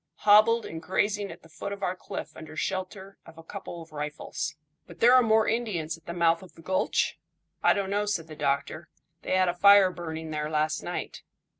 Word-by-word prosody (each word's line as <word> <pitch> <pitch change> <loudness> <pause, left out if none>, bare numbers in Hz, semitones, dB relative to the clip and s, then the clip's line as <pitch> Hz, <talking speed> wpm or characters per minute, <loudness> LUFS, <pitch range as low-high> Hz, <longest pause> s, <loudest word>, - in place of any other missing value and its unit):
"Hobbled, 215 +2 +5
and 160 0 -7
grazing 205 +2 -1
at - - -12
the - - -15
foot 165 +5 -7
of 200 - -6
our 180 - 0
cliff - - -7
under 155 0 -10
shelter 190 +2 -4
of 165 -1 -15
a 165 - -11
couple 175 -1 -8
of 160 - -19
rifles." 150 0 -4 0.3
"But 170 -1 -13
there 240 +2 +6
are 255 - +8
more 220 -1 +3
Indians 195 -9 -1
at 165 - -22
the - - -3
mouth 170 -1 +2
of 185 - -14
the 165 - -16
gulch?" 185 +3 0 0.4
"I - - +5
don't 200 -1 -2
know," 205 +1 0
said 190 -6 -1
the 155 -1 -10
doctor. 140 -1 -2 0.3
"They - - -1
had 185 0 +3
a 175 - +1
fire 200 +1 +6
burning 160 -2 -6
there 150 0 -2
last 155 0 0
night." - - -5
180 Hz, 210 wpm, -27 LUFS, 160-200 Hz, 0.4 s, are